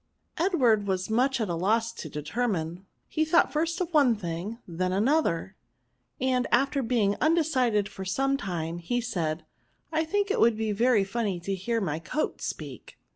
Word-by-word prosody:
Edward 250 Hz, -, +3 dB
was 190 Hz, +1 st, -1 dB
much 260 Hz, +3 st, +2 dB
at 220 Hz, -, 0 dB
a 175 Hz, -, -2 dB
loss 220 Hz, +7 st, +1 dB
to 155 Hz, -, -7 dB
determine, 175 Hz, +2 st, -3 dB, 0.2 s
he 315 Hz, -, 0 dB
thought 315 Hz, +2 st, +3 dB
first 330 Hz, +4 st, 0 dB
of 355 Hz, -2 st, -3 dB
one 275 Hz, -6 st, +5 dB
thing, 185 Hz, +3 st, -5 dB
then 180 Hz, +1 st, -2 dB
of 185 Hz, -, 0 dB
an -, -, +2 dB
other; 210 Hz, -, +1 dB, 0.6 s
and 255 Hz, -1 st, +1 dB
after 275 Hz, +3 st, +2 dB
being 225 Hz, -5 st, +1 dB
undecided 260 Hz, -10 st, +2 dB
for 195 Hz, -2 st, -8 dB
some 270 Hz, +9 st, +1 dB
time, 175 Hz, -7 st, -3 dB
he 245 Hz, +9 st, -1 dB
said, 170 Hz, -10 st, -2 dB, 0.2 s
" -, -, -42 dB
I 320 Hz, 0 st, +1 dB
think 405 Hz, +5 st, 0 dB
it -, -, 0 dB
would 230 Hz, -1 st, +4 dB
be 220 Hz, -1 st, -1 dB
very 225 Hz, 0 st, +3 dB
funny 195 Hz, -2 st, -2 dB
to 195 Hz, +3 st, -2 dB
hear 225 Hz, +5 st, -1 dB
my 160 Hz, -7 st, -2 dB
coat 300 Hz, -, -3 dB
speak." -, -, -7 dB
225 Hz, 180 wpm, -27 LUFS, 185-275 Hz, 0.6 s, one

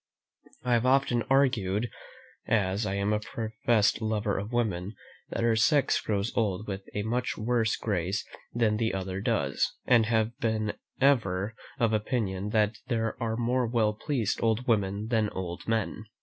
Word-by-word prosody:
I 125 Hz, -, +2 dB
have 120 Hz, +1 st, +3 dB
often 130 Hz, -2 st, +3 dB
argued, 120 Hz, -6 st, +2 dB, 0.6 s
as 100 Hz, -1 st, +1 dB
I 95 Hz, -, -1 dB
am 100 Hz, +2 st, +1 dB
a 105 Hz, -, +1 dB
professed 110 Hz, 0 st, 0 dB
lover 110 Hz, -2 st, 0 dB
of 100 Hz, +4 st, -6 dB
women, 105 Hz, -4 st, -1 dB, 0.3 s
that -, -, -2 dB
our 115 Hz, -1 st, +3 dB
sex 140 Hz, +6 st, +3 dB
grows 100 Hz, 0 st, -1 dB
old 105 Hz, -2 st, 0 dB
with 95 Hz, -1 st, -4 dB
a 105 Hz, -, -1 dB
much 120 Hz, +3 st, -1 dB
worse 115 Hz, 0 st, +1 dB
grace 95 Hz, -2 st, -1 dB, 0.3 s
than 115 Hz, -3 st, +1 dB
the 110 Hz, -2 st, 0 dB
other 95 Hz, 0 st, -3 dB
does; -, -, 0 dB
and 115 Hz, -3 st, +4 dB
have 110 Hz, -1 st, +2 dB
ever 110 Hz, -1 st, 0 dB
been -, -, -18 dB
of 110 Hz, -, 0 dB
opinion 105 Hz, -3 st, -1 dB
that 105 Hz, 0 st, +1 dB
there 115 Hz, -2 st, -1 dB
are 115 Hz, -1 st, -1 dB
more 120 Hz, +1 st, +1 dB
well 110 Hz, -2 st, +2 dB
pleased 115 Hz, -1 st, -1 dB
old 115 Hz, +1 st, +1 dB
women 105 Hz, -1 st, +1 dB
than 110 Hz, -3 st, +2 dB
old 90 Hz, -2 st, -6 dB
men. 110 Hz, -1 st, -1 dB
110 Hz, 160 wpm, -28 LUFS, 100-115 Hz, 0.6 s, and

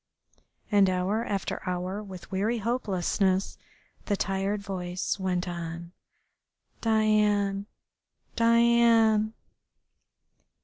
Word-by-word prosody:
And 200 Hz, -2 st, +5 dB
hour 185 Hz, +5 st, 0 dB
after 200 Hz, -4 st, -3 dB
hour 180 Hz, +3 st, -3 dB
with 190 Hz, -2 st, -10 dB
weary 210 Hz, +5 st, 0 dB
hopelessness 195 Hz, -4 st, 0 dB, 0.5 s
the 205 Hz, -, 0 dB
tired 195 Hz, +2 st, -1 dB
voice 185 Hz, -1 st, -3 dB
went 185 Hz, -1 st, -1 dB
on 170 Hz, 0 st, -6 dB, 0.9 s
"Diane, 210 Hz, -2 st, +2 dB, 0.7 s
Diane...." 230 Hz, -2 st, +4 dB
200 Hz, 80 wpm, -27 LUFS, 185-220 Hz, 0.9 s, And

